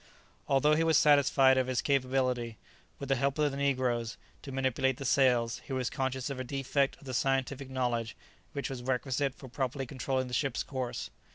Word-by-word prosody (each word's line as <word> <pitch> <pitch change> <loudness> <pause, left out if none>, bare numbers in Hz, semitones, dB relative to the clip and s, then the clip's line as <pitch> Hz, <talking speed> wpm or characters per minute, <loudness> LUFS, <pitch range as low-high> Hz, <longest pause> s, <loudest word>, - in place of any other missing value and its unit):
Although 145 +2 +4
he 160 +2 +3
was 165 -1 +4
satisfied 135 -3 +5
of 130 - 0
his 130 -2 0
capability, 130 -4 0 0.4
with 140 - -6
the 135 - +4
help 140 +1 0
of 150 -1 +2
the 135 - -5
negroes, 125 -4 0 0.2
to 135 - -8
manipulate 130 -1 0
the 135 - -6
sails, 125 -4 +2
he 135 - -4
was 130 -2 -1
conscious 130 0 -2
of 135 - -5
a - - -2
defect 135 +1 0
of - - -19
the 130 -2 -6
scientific 135 +1 0
knowledge 120 -3 -1 0.4
which 140 - -3
was 130 -2 -5
requisite 130 +2 -1
for 135 - -11
properly 135 +1 -3
controlling 130 0 -2
the 125 - -8
ship's 135 0 0
course. 125 -3 -4
130 Hz, 190 wpm, -30 LUFS, 125-140 Hz, 0.4 s, satisfied